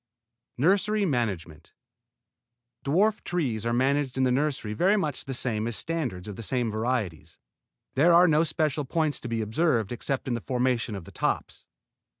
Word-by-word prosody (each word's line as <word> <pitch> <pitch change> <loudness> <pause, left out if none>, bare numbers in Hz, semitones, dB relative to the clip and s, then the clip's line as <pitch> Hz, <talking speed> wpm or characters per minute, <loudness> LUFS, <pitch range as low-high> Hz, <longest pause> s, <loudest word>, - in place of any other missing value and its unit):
NURSERY 200 - +2
MANAGEMENT 100 - -3 1.1
Dwarf 200 +9 +2
trees 125 -11 -1
are - - +1
managed 135 +2 +1
in 130 - +2
the 130 - +3
nursery 135 -5 -1
very 190 - +3
much 150 -9 -2
the 135 - -4
same 115 -3 -1
as 120 - -2
standards 115 - -3
of 105 - -7
the - - -6
same 120 0 -1
varieties. 105 - -2 0.6
There 155 +6 +4
are 175 +1 +7
no 155 0 +4
special 155 -2 0
points 155 +1 0
to - - -7
be 115 -1 -1
observed 115 - +1
except 130 +3 -3
in 125 - 0
the 120 - -2
formation 125 -3 0
of 95 -4 -7
the - - -12
tops. - - -3
130 Hz, 165 wpm, -27 LUFS, 110-155 Hz, 1.1 s, are